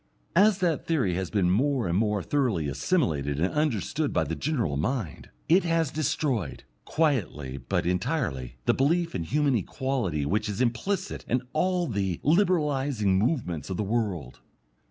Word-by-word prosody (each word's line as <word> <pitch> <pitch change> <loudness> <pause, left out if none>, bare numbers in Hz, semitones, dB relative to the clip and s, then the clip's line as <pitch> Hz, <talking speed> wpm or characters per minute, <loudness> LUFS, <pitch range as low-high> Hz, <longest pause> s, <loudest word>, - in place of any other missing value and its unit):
As 205 +1 +5
that 170 -4 0
theory 135 - +1
has 95 -1 -2
been 90 -3 +2
more 130 +2 +1
and 85 - 0
more 105 -1 +1
thoroughly 120 - 0
assimilated 70 - 0
and 90 +4 0
understood 150 - 0
by 90 - +1
the 80 +2 -3
general 125 - -1
mind, 95 - -3 0.2
it 180 +5 +5
has 165 -3 +1
destroyed, 135 - -1 0.2
quietly 90 - 0
but - - -1
entirely, 90 - -1
the - - +4
belief 165 +5 +1
in 85 - -3
human 145 - +1
equality 115 - -1
which 105 +7 0
is 100 - -4
implicit 165 - -1
in 125 +1 +1
all 180 +2 +1
the 100 - -2
"Liberalizing" 145 - +2
movements 100 - -1
of 95 - -3
the - - 0
world. 100 - -2
115 Hz, 155 wpm, -27 LUFS, -, 0.2 s, As